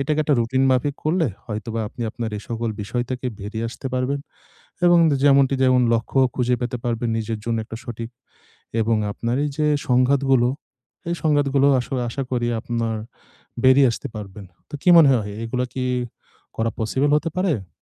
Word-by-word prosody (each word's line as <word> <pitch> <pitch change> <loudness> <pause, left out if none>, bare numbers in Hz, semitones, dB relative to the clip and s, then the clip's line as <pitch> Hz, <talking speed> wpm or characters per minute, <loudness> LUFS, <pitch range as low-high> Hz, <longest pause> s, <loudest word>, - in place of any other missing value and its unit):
এটাকে 150 +3 0
একটা 145 - +3
রুটিনমাফিক 130 +3 +1
করলে 165 +1 +2 0.2
হয়তোবা 115 +1 -4
আপনি 120 - -7
আপনার 115 -2 -4
এসকল 115 +1 -4
বিষয় 120 +4 -2
থেকে 130 0 -3
বেরিয়ে 110 +3 -4
আসতে 125 - -8
পারবেন। 135 +2 -1 0.7
এবং 175 0 +6 0.3
যেমনটি 140 -1 +5
যেমন 130 -1 +4
লক্ষ্য 115 +3 0 0.2
খুঁজে 125 -1 +1
পেতে 120 0 -2
পারবেন 120 0 -1
নিজের 110 0 -3
জন্য 115 -1 -1
একটা 110 - -8
সঠিক 115 -1 -6 0.7
এবং 110 0 +2 0.2
আপনার 120 +3 -2
এই 150 - -1
যে 150 - +2 0.2
সংঘাতগুলো 130 0 +3 0.6
এই 170 - 0
সংঘাতগুলো 145 -2 +3
আসলে 125 +1 -3
আশা 135 - -3
করি 120 -1 0
আপনার 115 -1 -2 0.7
বেরিয়ে 130 +1 +6
আসতে - - -6
পারবেন। 100 -1 -8 0.3
তো - - -10
কি - - +1
মনে 155 -4 +8
হ - - +4
হয় 100 0 -7
এগুলা 125 +2 -1
কি 130 -1 -2 0.7
করা 115 0 0
পসিবল 135 +6 +1
হতে 165 +2 -1
পারে? 135 - -1
125 Hz, 165 wpm, -22 LUFS, 115-140 Hz, 0.7 s, মনে